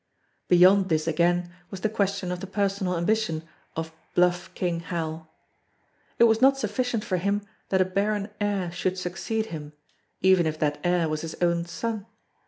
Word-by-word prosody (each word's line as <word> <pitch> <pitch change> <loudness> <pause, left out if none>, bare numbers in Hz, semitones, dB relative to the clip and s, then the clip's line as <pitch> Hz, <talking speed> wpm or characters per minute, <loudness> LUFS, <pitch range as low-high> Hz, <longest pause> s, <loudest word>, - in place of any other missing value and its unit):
Beyond 185 +2 +6
this 155 -1 +1
again 175 +2 +1 0.2
was 195 -2 -7
the 220 - +2
question 200 -3 -1
of 180 - -3
the 195 - -6
personal 195 -2 0
ambition 170 -3 0 0.3
of 160 0 -4 0.2
"Bluff 175 0 +2
King 175 -2 -1
Hal." 160 -2 -4 0.9
It - - +5
was 225 0 +4
not 270 +1 +6
sufficient 240 -1 -1
for 185 - -1
him 200 +3 0 0.3
that 190 -1 +3
a - - +4
barren 200 +2 -1
heir 200 -4 0
should 185 +2 -1
succeed 190 +5 -2
him 150 -1 -7 0.5
even 185 -3 +4
if 155 0 -2
that 150 -1 0
heir 175 -2 +2
was 155 0 -2
his 165 -1 -6
own 170 -1 +1
son. 215 +4 -4
180 Hz, 170 wpm, -26 LUFS, 170-200 Hz, 0.9 s, Beyond